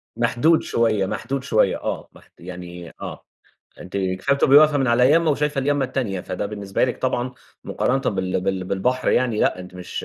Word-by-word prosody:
محدود 120 +7 +2
شوية، 110 -4 +1
محدود 130 +7 -3
شوية 105 -7 +2
آه، - - -5
محد - - -20
يعني 90 -1 -9
آه، - - -7 0.6
أنتِ 90 - -7
كفاية 95 +8 0
بتبقي 140 0 +6
واقفة 150 -1 +5
من 135 - +1
على 125 +2 +4
يامّة 165 +1 +4
وشايفة 150 0 -1
اليامّة 140 0 +1
التانية، 125 -8 -2
فده 90 +2 -4
بالنسبة 100 -2 -1
لِك 125 - -4
طبعًا 125 -1 -1 0.3
مقارنةً 130 -3 0
بال 95 -1 -1
بال 95 0 -2
بالبحر 125 +8 -1
يعني 120 -4 +1
لأ - - +1
أنتِ 90 0 -10
مش، 90 -1 -6
120 Hz, 180 wpm, -22 LUFS, 95-135 Hz, 0.6 s, بتبقي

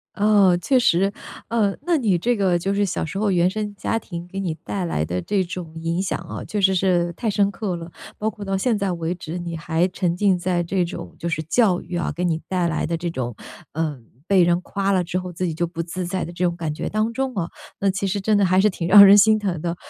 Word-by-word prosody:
嗯， 200 -4 +4
确 260 +7 +3
实， 195 -4 +3 0.4
呃， 215 -4 +1
那 350 -1 +2
你 210 - +2
这 240 +6 +1
个 185 -3 +2
就 195 +3 -1
是 205 - +2
小 190 - -2
时 175 +4 -6
候 210 -1 +1
原 175 -1 +3
生 210 +1 -4
家 225 - -1
庭 175 -5 -8
给 195 +2 -6
你 175 -5 -2
带 195 -3 -3
来 80 - -1
的 90 +3 -3
这 200 -2 0
种 175 -3 -7
影 165 +2 -1
响 195 - -2
啊， 170 -1 -7
确 210 - -3
实 190 0 +4
是 175 -2 +1
太 220 +5 -2
深 200 0 +2
刻 200 -3 -3
了， 170 0 -8 0.3
包 215 - -1
括 210 -1 -6
到 195 -1 -1
现 230 +3 +1
在 200 -2 -1
为 170 0 -2
止， 170 -1 -6
你 170 -1 -5
还 165 +2 0
沉 180 -2 -1
浸 195 -2 +3
在 175 0 0
这 180 +1 0
种 175 - -7
就 170 - -3
是 165 -2 -2
教 185 +1 +2
育 175 +1 -6
啊， 170 - -1
给 180 - -2
你 160 -2 0
带 180 -2 0
来 155 - -1
的 170 - -1
这 170 +1 -3
种， 125 -8 -4 0.4
呃， 150 -3 -2 0.3
被 195 -2 +4
人 175 +1 +3
夸 195 0 -2
了 185 - +2
之 180 +2 -2
后， 180 -1 -6
自 180 +2 -2
己 165 - -3
就 170 +1 -1
不 165 0 -7
自 180 +2 -5
在 185 +1 -2
的 170 - -8
这 175 +1 -2
种 175 -1 0
感 160 -3 -3
觉 - - -4
当 215 +2 0
中 265 +1 -2
啊， 175 -4 -2 0.3
那 200 - +2
其 195 +1 -2
实 195 +2 -1
真 210 +2 +2
的 200 - +3
还 185 +1 +4
是 210 - +5
挺 170 -3 -4
让 200 +1 +10
人 200 +1 +8
心 215 +1 +5
疼 185 -6 -2
的。 170 0 -2
185 Hz, 285 characters per minute, -22 LUFS, 170-200 Hz, 0.4 s, 让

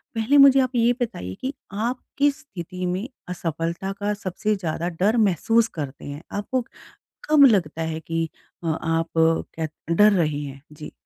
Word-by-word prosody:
पहले 230 +6 +3
मुझे 275 -1 +8
आप 255 0 -2
ये 240 +1 +4
बताइए 95 - -3
कि 270 +2 -2 0.2
आप 235 +5 -2 0.2
किस 290 +1 +2
स्थिति 185 - -7
में 185 +6 -2 0.2
असफलता 170 +2 -3
का 205 +1 0
सबसे 210 +1 -2
ज़्यादा 170 -2 -3
डर 215 +4 +3
महसूस 225 +3 +3
करते 140 -2 -6
हैं? 145 +2 -7
आपको 240 +5 -2 0.7
कब 300 -2 +8
लगता 175 - +3
है 160 0 -3
कि 165 +1 -2 0.4
अ, - - -2
आप 165 +1 0 0.5
क 160 -1 -1 0.2
डर 205 +5 +6
रहे 155 -6 +1
हैं? 140 -1 -7
जी। 150 0 -9
190 Hz, 165 wpm, -23 LUFS, 165-230 Hz, 0.7 s, मुझे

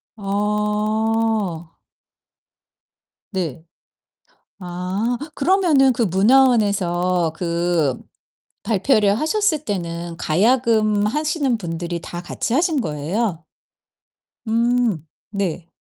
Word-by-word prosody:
어. 210 -2 -1 1.6
네. 165 -5 -3 1.0
아 185 +6 -2 0.2
그러면은 300 -5 +4
그 240 0 -1
문화원에서 190 -5 +3
그 170 -5 0 0.7
발표를 210 0 +2
하셨을 315 -2 +1
때는 170 -4 -4
가야금 215 +2 +2
하시는 295 -1 0
분들이 170 -2 -4
다 175 +1 -7
같이 200 +5 -3
하신 315 -1 +2
거예요? 165 +3 -2 1.0
음 230 -6 +1 0.3
네. 180 -4 -3
210 Hz, 155 characters per minute, -21 LUFS, 175-240 Hz, 1.6 s, 그러면은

